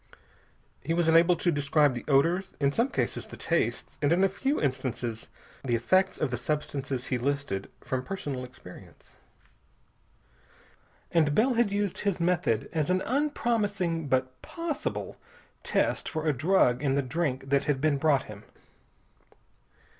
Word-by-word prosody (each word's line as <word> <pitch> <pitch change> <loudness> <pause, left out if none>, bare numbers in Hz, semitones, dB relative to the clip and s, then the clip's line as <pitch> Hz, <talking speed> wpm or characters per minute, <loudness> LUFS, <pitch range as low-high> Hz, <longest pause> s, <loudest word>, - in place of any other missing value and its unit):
He 165 +4 -1
was 170 -1 +1
enabled 165 +1 +5
to 175 - +3
describe 145 -1 +2
the 120 - -5
odors, 170 +7 +2
in 140 -1 +2
some 235 - +1
cases - - -2
the - - -10
tastes, - - -1
and 145 0 +2
in 180 +3 +4
a 195 - +4
few 270 +9 -1
instances 130 -4 -3 0.4
the 120 -3 +1
effects 185 +11 +2
of 145 - -1
the 120 - -1
substances 140 -2 -3
he 125 - +1
listed, 140 -7 -2
from 130 -1 -3
personal 145 -9 -4
experience. 125 -8 -14 2.0
And 155 -4 +3
Bell 250 +7 +3
had 235 -3 +2
used 205 -1 -1
his 200 -4 -1
method 170 -10 +1
as 155 -1 0
an 185 +1 +1
unpromising 215 - 0
but 130 -1 -1
possible 335 -3 -4 0.4
test - - 0
for 155 0 -3
a 155 - +3
drug 145 -4 +3
in 135 -2 +1
the 140 - +1
drink 135 -1 -2
that 140 0 +3
had 145 -3 +1
been 145 -1 +1
brought 145 -3 +3
him. 105 -1 -11
150 Hz, 150 wpm, -28 LUFS, 130-185 Hz, 2.0 s, enabled